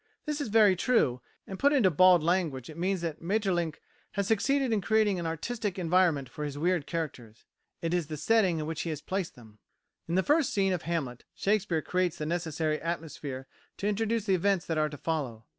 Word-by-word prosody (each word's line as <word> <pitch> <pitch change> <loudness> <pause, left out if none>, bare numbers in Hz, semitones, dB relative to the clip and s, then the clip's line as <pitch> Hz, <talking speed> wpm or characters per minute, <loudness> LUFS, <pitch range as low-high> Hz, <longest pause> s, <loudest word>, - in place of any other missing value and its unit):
This 300 0 -2
is 285 - -2
very 210 -3 +5
true, 170 - +2 0.2
and 190 - -7
put 285 +1 +4
into 225 -10 +4
bald 180 +1 +6
language 160 -6 0
it - - -12
means 185 0 0
that 165 -3 -4
Maeterlinck 175 -4 0 0.3
has 200 -1 -1
succeeded 255 +4 +2
in 210 - +1
creating 215 -2 +2
an 170 - -3
artistic 200 +5 -3
environment 170 -5 +2
for 150 +5 -7
his 145 -1 -4
weird 170 -1 0
characters; 130 -10 -5 0.4
it 165 +1 0
is 175 -4 0
the 155 -1 -5
setting 190 +1 +3
in 155 - -3
which 160 0 -3
he 170 - -3
has 155 -3 -3
placed 185 +2 -3
them. 110 -3 -16 0.5
In 170 - -1
the 190 - +3
first 295 - +2
scene 195 -2 +2
of 175 - -2
Hamlet, 145 -8 -3
Shakespeare 190 -6 0
creates 180 -2 0
the 150 - -3
necessary 160 -2 -1
atmosphere 155 -5 -5 0.3
to 200 - -2
introduce 220 +1 0
the 195 - +2
events 185 0 +1
that 160 -2 -1
are 155 0 +2
to 145 - -8
follow. 130 -9 -3
175 Hz, 205 wpm, -29 LUFS, 155-200 Hz, 0.5 s, bald